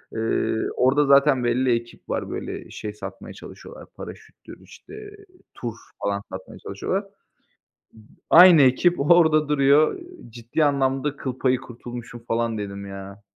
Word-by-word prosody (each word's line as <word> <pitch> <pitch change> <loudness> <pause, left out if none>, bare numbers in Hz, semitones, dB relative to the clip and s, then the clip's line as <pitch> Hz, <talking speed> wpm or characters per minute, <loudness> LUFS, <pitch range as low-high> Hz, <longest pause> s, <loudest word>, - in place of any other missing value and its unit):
Eee, 110 0 -1 0.2
orada 140 +3 +3
zaten 140 -1 +4
belli 120 +1 +2
ekip 115 0 -8
var, - - -3
böyle, - - -6
şey 105 -1 -7
satmaya 105 - -9
çalışıyorlar - - -12
paraşüttür, - - -12
işte, - - -16 0.6
tur 120 -3 -6 0.3
falan 100 0 -1
satmaya 95 0 -9
çalışıyorlar. 190 - -4 1.2
Aynı 175 -2 +8
ekip, 140 +7 +3
orada 155 -1 +4
duruyor 145 - +3 0.3
ciddi 120 +7 -2
anlamda 140 0 0
kıl 130 -1 -5
payı 130 -1 +2
kurtulmuşum 120 0 -10
falan 115 -1 -1
dedim 100 -1 -6
ya. 100 +1 -10
130 Hz, 125 wpm, -23 LUFS, 115-145 Hz, 1.2 s, Aynı